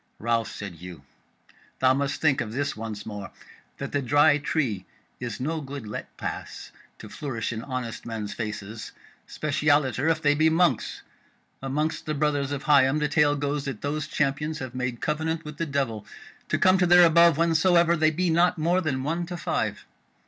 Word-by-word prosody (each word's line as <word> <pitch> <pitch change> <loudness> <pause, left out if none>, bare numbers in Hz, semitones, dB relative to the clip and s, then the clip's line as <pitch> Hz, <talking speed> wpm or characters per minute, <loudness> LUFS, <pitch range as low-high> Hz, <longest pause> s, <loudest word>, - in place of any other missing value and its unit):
"Ralph," 115 0 0
said 100 -5 -7
Hugh, 85 -3 -10 0.7
"thou 130 0 +4
must 140 +1 -1
think 140 -5 +3
of 110 -2 -5
this 145 +3 -2
once 110 -2 -6
more, 105 -2 -6 0.5
that - - -5
the 145 - 0
Dry 145 +3 +4
Tree 125 - -1 0.3
is 125 0 -5
no 155 +5 -2
good 140 -3 -7
let 105 - -7
pass - - -6 0.3
to - - -10
flourish 120 -6 -4
in 115 - -4
honest 125 -3 -5
men's 110 -3 -5
faces; 105 0 -6 0.3
specialiter 145 -1 +1
if 160 -1 +2
they 145 -2 +3
be 155 +2 +3
monks. 160 -6 +1 0.6
Amongst 150 +5 -2
the 155 - -1
brothers 145 -1 0
of 140 -1 -3
Higham 140 -1 +4
the 150 -1 +1
tale 150 -1 +3
goes 145 0 -2
that 135 -6 -5
those 145 +1 -2
Champions 150 +1 -1
have 130 -3 -6
made 125 -2 -3
covenant 160 +1 -2
with 150 -1 -8
the 165 - -2
devil 130 -7 -2 0.4
to - - +1
come 185 0 +4
to 180 - +3
their 175 0 +8
above 170 -1 +5
whensoever 170 +1 +4
they 155 -1 +3
be 175 +2 0
not 175 +2 +3
more 170 +4 +2
than 135 -6 -2
one 165 +4 -2
to 175 0 -5
five. - - -2
145 Hz, 180 wpm, -26 LUFS, 125-160 Hz, 0.7 s, their